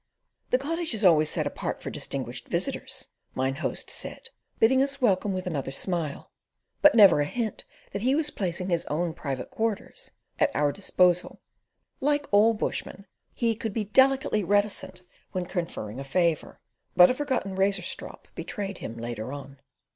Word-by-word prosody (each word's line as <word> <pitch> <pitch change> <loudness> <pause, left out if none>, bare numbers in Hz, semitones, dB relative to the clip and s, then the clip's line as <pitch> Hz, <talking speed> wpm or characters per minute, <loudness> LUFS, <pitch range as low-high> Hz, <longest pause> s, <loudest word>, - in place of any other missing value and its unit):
"The 250 - +4
Cottage 320 +1 -2
is 210 -1 0
always 155 -4 +6
set - - -1
apart - - -3
for - - -6
distinguished - - -5
visitors," - - -2 0.3
Mine 130 +1 0
Host 155 - -3
said, - - -6 0.3
bidding 260 +4 +5
us 275 0 0
welcome 205 -5 +2
with 185 -1 -3
another 145 -7 -2
smile, 155 +1 -3 0.5
but 300 -3 +7
never 200 -8 +8
a - - +2
hint 225 +6 -3 0.3
that 200 - -3
he 260 +4 +3
was 300 -1 +2
placing 180 -1 -2
his 170 -1 +1
own 165 +2 -1
private 135 -5 -5
quarters 225 -2 -3 0.3
at - - +4
our 145 0 +3
disposal. 180 -1 +2 0.6
Like 290 +1 +1
all 215 +3 +5
bushmen, 200 -1 -4 0.3
he 230 -2 +1
could 225 -1 -4
be 220 - 0
delicately 265 0 +3
reticent 190 -1 0 0.3
when 185 -2 -1
conferring 165 - -4
a - - -4
favour; 165 +2 0 0.4
but 180 +4 +8
a - - +1
forgotten 255 -8 -2
razor 195 -1 +2
strop - - -6
betrayed 200 -3 -5
him 115 - -6
later 115 0 -5
on. 140 -1 -9
190 Hz, 160 wpm, -27 LUFS, 165-230 Hz, 0.6 s, never